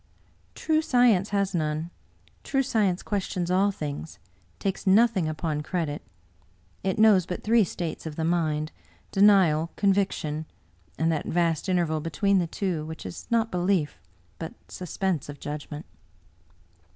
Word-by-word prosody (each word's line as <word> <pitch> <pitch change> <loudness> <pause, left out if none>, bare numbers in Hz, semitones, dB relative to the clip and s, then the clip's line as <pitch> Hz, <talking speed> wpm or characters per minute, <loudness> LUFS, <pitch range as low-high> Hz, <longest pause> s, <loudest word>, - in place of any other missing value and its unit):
" - - -36
True 315 -1 +1
science 245 - +3
has 200 -1 0
none. 155 0 -1 0.5
True 270 -1 +1
science 205 -8 +1
questions 185 -3 -2
all 195 +2 +4
things, 150 -4 -5 0.4
takes 195 0 -3
nothing 200 -3 +4
upon 155 -1 -2
credit. 155 -2 -2 0.8
It 190 -1 0
knows 210 -5 +5
but 180 - -5
three 225 +1 +4
states 170 -2 -4
of 155 - -6
the 160 - -2
mind— 155 -2 0 0.4
denial, 190 -6 +5
con 200 -1 +3
viction, 160 -6 -1 0.5
and 165 +1 +2
that 155 - -2
vast 170 +1 0
interval 170 -4 +1
between 190 +5 +1
the 175 - 0
two 175 -3 -2
which 160 +1 -8
is 90 - -7
not 230 -1 +1
belief 175 - 0 0.4
but 165 - -6
suspense 180 -4 -2
of 145 - -8
judgment." 150 +1 -6
175 Hz, 140 wpm, -26 LUFS, 155-200 Hz, 0.8 s, knows